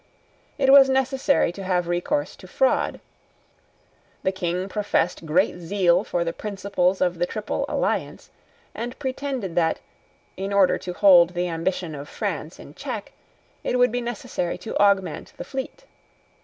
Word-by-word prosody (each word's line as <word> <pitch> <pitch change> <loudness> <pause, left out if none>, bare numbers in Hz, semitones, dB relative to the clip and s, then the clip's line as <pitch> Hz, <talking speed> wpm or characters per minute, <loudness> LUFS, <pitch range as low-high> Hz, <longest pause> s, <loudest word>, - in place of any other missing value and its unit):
It 270 -2 +4
was 275 -1 +8
necessary 265 - +2
to 195 +2 -8
have 180 -2 0
recourse 175 +13 -1
to - - -13
fraud. - - +1 1.2
The 190 - +2
King 180 0 -2
professed 190 -5 -1
great 175 +3 +2
zeal 180 +1 +2
for 175 -5 -1
the 165 0 -3
principles 195 -2 -1
of 180 -2 +1
the 175 - +1
Triple 215 +2 -3
Alliance, - - -2 0.4
and 245 +2 -5
pretended 265 -7 -3
that, 165 -1 +1 0.6
in 195 +1 -3
order 195 -2 +4
to 180 - -6
hold 180 -2 +6
the 175 +1 0
ambition 165 0 -2
of 145 0 -8
France - - -4
in - - -12
check, - - -6 0.5
it 250 - 0
would 250 -1 +4
be 245 +1 -1
necessary 225 -7 -3
to 225 - -7
augment 195 -5 +2
the - - -6
fleet. 270 - -6
190 Hz, 150 wpm, -24 LUFS, 175-245 Hz, 1.2 s, was